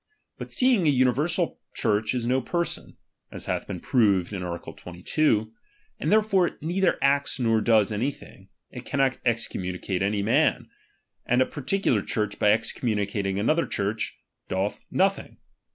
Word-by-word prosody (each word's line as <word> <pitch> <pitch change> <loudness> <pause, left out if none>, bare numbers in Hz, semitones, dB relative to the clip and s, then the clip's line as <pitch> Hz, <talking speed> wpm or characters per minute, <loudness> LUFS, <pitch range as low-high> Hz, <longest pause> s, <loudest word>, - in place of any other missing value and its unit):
But - - -7
seeing 245 -10 +3
an 145 - +4
uni 125 0 +4
■Bersal 165 +7 -1 0.2
Church 110 +1 +1
is 120 -2 -2
no 130 +2 +1
person, 170 +6 -3 0.3
(as - - -7
hath - - -2
been - - -5
proved 100 -6 +2
in 95 - -4
art. 85 -1 -5
22), 110 - -1 0.5
and - - -1
therefore 210 -4 +3
neither 175 +4 +1
acts 140 0 +2
nor 115 -3 +2
does 110 -3 +3
any 110 +6 0
thing, 100 -7 -13 0.2
it 125 - -8
cannot 135 -2 0
excommunicate 95 -5 -2
any 100 +1 0
man; 110 - +1 0.6
and 125 - +3
a 130 - +4
particular 135 - 0
Church 105 +1 -2
by 105 - +4
excommunicating 105 -3 -1
another 155 +11 +1
Church, 105 +3 -2 0.3
doth 95 +2 -2
nothing. 195 +1 0
115 Hz, 150 wpm, -25 LUFS, 105-145 Hz, 0.6 s, an